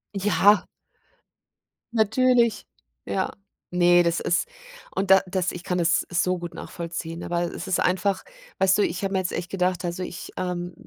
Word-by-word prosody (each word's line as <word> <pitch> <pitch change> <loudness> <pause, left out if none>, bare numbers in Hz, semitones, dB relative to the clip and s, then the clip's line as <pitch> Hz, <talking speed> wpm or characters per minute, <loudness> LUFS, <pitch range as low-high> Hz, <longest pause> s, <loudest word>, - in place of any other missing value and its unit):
Ja. 205 +1 +4 1.3
Natürlich. 235 0 +3 0.4
Ja. 190 - -1 0.4
Ne, 175 0 +5
das 170 0 +1
ist 175 - 0 0.5
und 195 0 -1
da 190 -1 +8
das 185 -1 -1
ich 175 - -8
kann 180 0 -1
es 170 0 +2
so 180 +1 +1
gut 175 -1 -7
nachvollziehen, 170 0 -6
aber 170 0 -1
es - - -6
ist 185 - +1
einfach 190 +2 +1 0.4
weißt 190 0 +4
du, 205 - +3
ich 180 +2 -2
habe 195 - -1
mir 190 - +2
jetzt 185 -1 -2
echt 175 0 -4
gedacht 180 -2 0
also, 175 +1 -3
ich, 180 - -7
ähm 175 -1 -3
180 Hz, 165 wpm, -25 LUFS, 175-195 Hz, 1.3 s, da